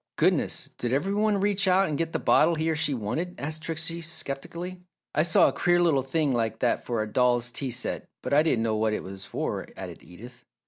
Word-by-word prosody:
"Goodness! - - +1
Did 120 0 -1
every 155 +9 0
one 210 0 +2
reach 200 0 +1
out 190 +1 +4
and 150 - -2
get 165 +2 -1
the - - 0
bottle 165 +2 +4
he 160 +1 0
or - - 0
she 150 -1 0
wanted?" 155 - -3
asked 155 +2 -4
Trixie, 165 +1 -3
sceptically. 170 +3 -5 0.3
"I - - +3
saw 165 0 +5
a - - 0
queer 175 0 +2
little 165 -6 +3
thing 140 +1 0
like 115 -2 0
that 120 +1 0
for 115 -3 -1
a - - -5
doll's 120 +1 +2
tea 135 +2 -3
set 125 +1 -2
but - - -2
I 145 - +6
didn't 140 -8 +1
know 110 -1 0
what 110 0 +1
it - - -3
was 95 0 -7
for," - - -3
added - - -8
Edith. 115 +9 -13
150 Hz, 225 wpm, -27 LUFS, 120-170 Hz, 0.3 s, I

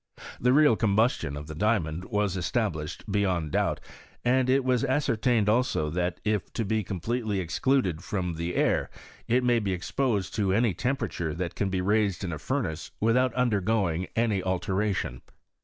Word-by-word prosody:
The 125 - +3
real 145 -3 +5
combustion 110 - +1
of 75 - -7
the 80 - -7
diamond 90 -3 0
was 105 -2 0
established 90 -5 -2
beyond 90 -6 0
doubt; - - +1 0.5
and 130 +1 +3
it 135 0 +3
was 130 0 +2
ascertained 125 -5 +1
also, 110 - +1
that 90 +1 -1
if 105 -3 0
it 115 -4 -1
be 110 +1 0
completely 105 +3 -2
excluded 90 +1 0
from 90 -4 -2
the 85 +2 -3
air, - - +1 0.4
it 125 +2 +2
may 120 -1 +3
be 100 -3 -1
exposed 100 +1 -1
to 100 -3 +1
any 110 0 +2
temperature 95 - -2
that 85 0 -3
can 100 - -1
be 95 -1 -1
raised 100 -2 +1
in 90 -3 -3
a 75 - -5
furnace 85 - -3
without 125 +4 +3
undergoing 100 -7 +1
any 110 -4 +1
altera 95 +3 0
tion. 60 -9 -3
105 Hz, 165 wpm, -27 LUFS, 90-120 Hz, 0.5 s, real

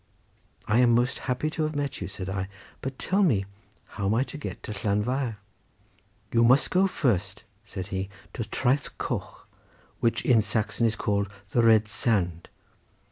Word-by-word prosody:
"I 110 +2 +3
am 120 -2 +5
most 120 +2 +1
happy 125 +5 0
to 160 - -3
have 155 0 -1
met 145 -1 -2
you," - - -3
said 100 -1 -6
I; 95 0 -2 0.3
"but 135 0 -4
tell 195 +2 +1
me 115 - +3 0.4
how 100 -2 -4
am 105 - +2
I 125 - +3
to 150 - -8
get - - -6
to - - -5
Llanfair?" 110 +5 0 1.0
"You 115 0 +5
must 125 +4 +5
go 190 +1 +4
first," 105 - 0 0.2
said 100 -3 -7
he, 95 +1 -2 0.2
"to 115 - -3
Traeth 130 +5 0
Coch, - - -4 0.5
which 115 - +1
in 120 -4 +5
Saxon 110 +2 +1
is 110 - 0
called 100 -1 0 0.2
the 120 - +3
'Red 110 -2 +5
Sand. 100 -7 0
115 Hz, 170 wpm, -27 LUFS, 100-130 Hz, 1.0 s, am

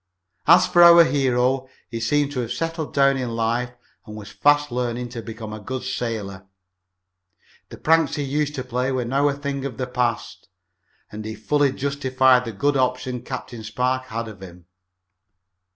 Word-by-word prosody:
As 170 +3 +7
for 175 - +3
our 170 0 +9
hero, 130 -2 +1 0.2
he 115 - -4
seemed 145 +5 +1
to 135 - -4
have 120 -1 -3
settled 165 +1 -3
down 140 -1 +3
in 125 -3 -3
life 115 +2 -1 0.3
and 105 - -9
was 105 -2 -9
fast 145 -1 +2
learning 120 0 -3
to 120 -1 -7
become 110 -1 -8
a 110 - -7
good 130 +5 -5
sailor. 105 -7 -4 1.2
The - - -10
pranks 160 -2 +2
he 145 - -2
used 150 +2 -1
to 130 - -4
play 125 +1 -2
were 130 -2 -1
now 135 +4 +1
a - - -1
thing 140 -1 -4
of 135 -4 -5
the 130 - -2
past, 125 -2 -3 0.6
and 110 +1 -7
he 110 0 -6
fully 140 +6 +1
justified 130 -2 +2
the 115 - -4
good 140 +7 0
opinion 125 -1 -1
Captain 125 -3 -7
Spark 125 +4 -1
had 115 -2 -5
of 105 -3 -11
him. 90 -2 -12
125 Hz, 175 wpm, -22 LUFS, 115-140 Hz, 1.2 s, our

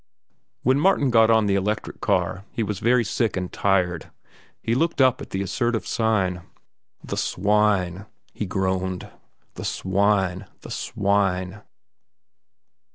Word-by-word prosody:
When 130 +3 +3
Martin 145 -6 +3
got 115 -1 +5
on 110 -1 +4
the 100 - +1
electric 105 +2 -2
car, 95 - 0
he 115 - -2
was 105 -2 -3
very 120 +1 +3
sick 110 -1 -1
and 90 -1 -4
tired. 90 -4 0 0.5
He 115 - -1
looked 165 +6 0
up 130 -1 +4
at - - -8
the 95 +1 -2
assertive 120 +3 -1
sign. 95 -6 0 0.6
"The - - -4
swine," 100 -1 +1 0.3
he 105 - -4
groaned. 95 +1 -2 0.4
"The - - -8
swine, 95 -1 0
the - - -10
swine." 100 -1 -1
100 Hz, 130 wpm, -24 LUFS, 95-115 Hz, 0.6 s, got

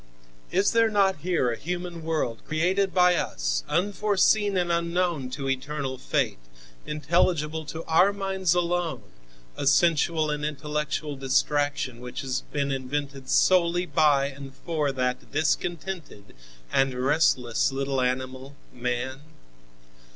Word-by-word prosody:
Is 195 +3 +2
there 230 -1 +4
not 195 -4 +2
here 160 -6 0
a - - -2
human 175 +1 -5
world 155 -8 -2
created 185 +5 +1
by 180 -1 +5
us, - - -1
unforeseen 205 +3 +2
and 175 -1 +1
unknown 170 -4 0
to 135 +1 -5
eternal 135 0 -3
fate, - - -1 0.5
intelligible 155 +1 0
to 160 +2 -6
our 180 +5 +4
minds 190 -3 0
alone, 175 -7 -1 0.5
a 140 - -2
sensual 160 +1 +3
and 150 0 -3
intellectual 150 0 -3
distraction, 135 -1 0
which 125 0 -6
has 130 -2 -2
been 140 -1 -1
invented 135 0 -4
solely 175 -1 +3
by 145 -3 +3
and 135 -1 -8
for 155 -4 0
that 125 -1 -2
discontented 155 - -2 0.4
and 135 -1 +2
restless 130 -3 +2
little 135 0 -1
animal, 130 +2 -3 0.2
man? 125 +2 -3
150 Hz, 120 wpm, -26 LUFS, 135-175 Hz, 0.5 s, by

